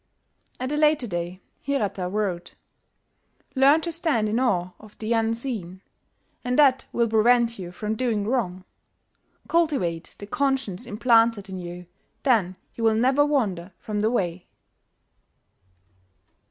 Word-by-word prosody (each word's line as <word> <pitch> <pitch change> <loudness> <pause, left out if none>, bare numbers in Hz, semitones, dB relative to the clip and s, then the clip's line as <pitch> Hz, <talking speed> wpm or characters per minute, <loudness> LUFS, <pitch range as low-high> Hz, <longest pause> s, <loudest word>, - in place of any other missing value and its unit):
At 255 +2 -3
a 295 - 0
later 300 -3 +3
day 175 -2 -4 0.2
Hirata 205 -9 -1
wrote 185 -4 -3 1.0
"Learn 280 +4 +5
to 335 - -3
stand 315 -10 +1
in 220 +3 0
awe 185 -8 +1
of 215 -1 -16
the 225 +2 -1
Unseen, 225 -5 -2 0.6
and 250 0 -1
that 270 -3 +4
will 235 -1 +1
prevent 230 +1 +3
you 175 -2 -6
from 210 +4 -3
doing 220 -4 -1
wrong. 195 -6 -2 0.8
Cultivate 265 - 0
the 205 - -8
conscience 260 -3 -1
implanted 230 -2 +3
in 190 -1 -5
you 175 0 -8 0.4
then 205 -9 +2 0.2
you 230 - -6
will 225 -1 +4
never 260 +5 +3
wander 205 -11 -1
from 210 -1 -4
the 215 +1 +2
Way." 180 -7 -2
225 Hz, 130 wpm, -24 LUFS, 185-255 Hz, 1.0 s, Learn